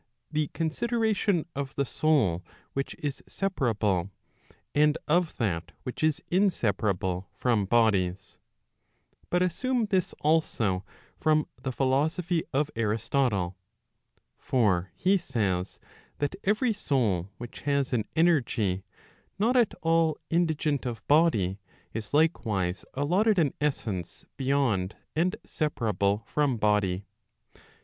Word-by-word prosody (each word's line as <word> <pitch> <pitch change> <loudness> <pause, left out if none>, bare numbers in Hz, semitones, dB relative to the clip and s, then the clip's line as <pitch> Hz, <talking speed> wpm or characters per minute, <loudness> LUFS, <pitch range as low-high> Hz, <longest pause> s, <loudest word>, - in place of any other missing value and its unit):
the 155 -1 0
consideration 205 - 0
of 140 -1 -4
the 140 - +1
soul 120 - +2 0.3
which 135 0 -3
is 145 -2 -4
separable, 110 - 0 0.6
and 150 +1 +4
of 170 +2 +2
that 85 -7 -2
which 125 - -5
is 155 -2 +2
inseparable 100 - +1
from 115 -5 +1
bodies. 95 -5 +1 0.9
But 180 +1 +2
assume 245 +7 0
this 190 -4 0
also 115 - +1 0.4
from 155 -1 +3 0.2
the 130 - -2
philosophy 155 +7 +1
of 145 +2 0
Aristotle. 110 -3 0 0.8
For 95 -8 +1
he 195 +1 +3
says, 100 - -1 0.4
that 145 +5 -1
every 215 +4 +2
soul 110 - 0
which 120 0 -8
has 140 -2 +1
an 110 -4 +1
energy 120 - +2 0.5
not 225 +6 +2
at 240 -4 +3
all 165 -2 +3
indigent 160 -4 +1
of 115 -2 -6
body, 110 - +3 0.3
is 110 -1 -5
likewise 105 - +1
allotted 185 +10 +2
an 155 -6 +2
essence 110 - -2
beyond 130 -8 +1 0.2
and 175 +4 +2
separable 105 - 0
from 145 0 +1
body. 105 -3 +1
135 Hz, 110 wpm, -28 LUFS, 105-165 Hz, 0.9 s, and